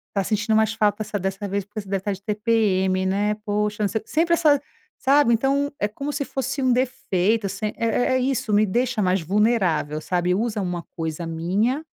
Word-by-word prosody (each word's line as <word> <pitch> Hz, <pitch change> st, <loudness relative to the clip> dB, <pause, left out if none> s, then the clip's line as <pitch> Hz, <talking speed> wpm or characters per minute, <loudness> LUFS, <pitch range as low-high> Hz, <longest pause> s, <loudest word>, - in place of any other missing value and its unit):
tá 195 Hz, -, +1 dB
sentindo 215 Hz, +2 st, 0 dB
mais 220 Hz, 0 st, +3 dB
falta 215 Hz, -1 st, +1 dB
de 210 Hz, -1 st, -4 dB
dessa 195 Hz, +2 st, -3 dB
vez 200 Hz, 0 st, -2 dB
porque 210 Hz, +1 st, -6 dB
você 195 Hz, -, -14 dB
deve 195 Hz, -1 st, -1 dB
tá 205 Hz, -, -1 dB
de 195 Hz, -, -9 dB
TPM, 205 Hz, -4 st, +1 dB
né? 205 Hz, +2 st, +1 dB
Poxa, 210 Hz, +1 st, -1 dB
não 205 Hz, -, +3 dB
se", 220 Hz, -, -2 dB
sempre 335 Hz, +6 st, +1 dB
essa, 300 Hz, -4 st, +3 dB, 0.4 s
sabe, 275 Hz, -3 st, +4 dB
então, 275 Hz, +4 st, +1 dB
é 205 Hz, -, +1 dB
como 280 Hz, +8 st, -5 dB
se 285 Hz, -, -1 dB
fosse 270 Hz, +1 st, -3 dB
um 255 Hz, -, +3 dB
defeito 225 Hz, -5 st, 0 dB
assim 215 Hz, +2 st, -3 dB
é -, -, -4 dB, 0.3 s
é -, -, +3 dB
é -, -, +2 dB
isso, 255 Hz, -4 st, -1 dB
me 210 Hz, +1 st, +5 dB
deixa 240 Hz, +3 st, 0 dB
mais 185 Hz, -1 st, +2 dB
vulnerável, 185 Hz, -5 st, +1 dB
sabe, 180 Hz, +2 st, 0 dB
usa 215 Hz, 0 st, -1 dB
uma 175 Hz, -2 st, -3 dB
coisa 160 Hz, 0 st, -4 dB
minha 200 Hz, -, 0 dB
210 Hz, 205 wpm, -23 LUFS, 190-240 Hz, 0.4 s, me